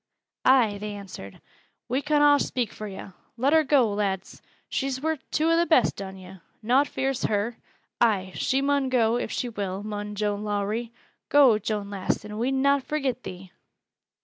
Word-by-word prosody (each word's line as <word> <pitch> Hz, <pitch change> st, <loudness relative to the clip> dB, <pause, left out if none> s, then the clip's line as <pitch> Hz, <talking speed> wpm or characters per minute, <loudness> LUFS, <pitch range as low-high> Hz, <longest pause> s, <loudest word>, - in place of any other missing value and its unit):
"Ay," 235 Hz, -6 st, +4 dB
they 210 Hz, 0 st, -5 dB
answered, 185 Hz, -, -10 dB, 0.5 s
"we 255 Hz, +4 st, 0 dB
con 295 Hz, 0 st, +2 dB
aw 290 Hz, 0 st, +7 dB
speak 245 Hz, -4 st, -2 dB
fur 215 Hz, -, -7 dB
yo'. 195 Hz, -1 st, -9 dB, 0.2 s
Let 270 Hz, +5 st, +2 dB
her 320 Hz, -1 st, +5 dB
go, 265 Hz, -7 st, +3 dB
lads! 200 Hz, -2 st, -3 dB, 0.3 s
She's 270 Hz, -1 st, -2 dB
worth 315 Hz, -1 st, -2 dB
two 315 Hz, +2 st, +1 dB
o' 335 Hz, +1 st, +4 dB
th' -, -, -6 dB
best 255 Hz, -9 st, +3 dB
on 190 Hz, -1 st, -7 dB
yo'. 190 Hz, 0 st, -12 dB, 0.3 s
Nowt 260 Hz, +6 st, +3 dB
fears 265 Hz, -1 st, -2 dB
her. 215 Hz, +3 st, -1 dB, 0.4 s
Ay, 200 Hz, -5 st, +2 dB
she 270 Hz, +1 st, 0 dB
mun 280 Hz, -1 st, +1 dB
go, 235 Hz, -2 st, +2 dB
if 235 Hz, -, -3 dB
she 250 Hz, -, -2 dB
will, 200 Hz, -4 st, -4 dB
mun 210 Hz, 0 st, -5 dB
Joan 205 Hz, 0 st, -1 dB
Lowrie! 210 Hz, +3 st, -2 dB, 0.4 s
Go, 265 Hz, -7 st, +6 dB
Joan 210 Hz, -1 st, -3 dB
lass, 200 Hz, +1 st, -2 dB
and 210 Hz, 0 st, -6 dB
we'n 265 Hz, +3 st, 0 dB
not 280 Hz, 0 st, +4 dB
forget 270 Hz, -3 st, -2 dB
thee!" 185 Hz, -2 st, -9 dB
230 Hz, 175 wpm, -26 LUFS, 205-270 Hz, 0.5 s, aw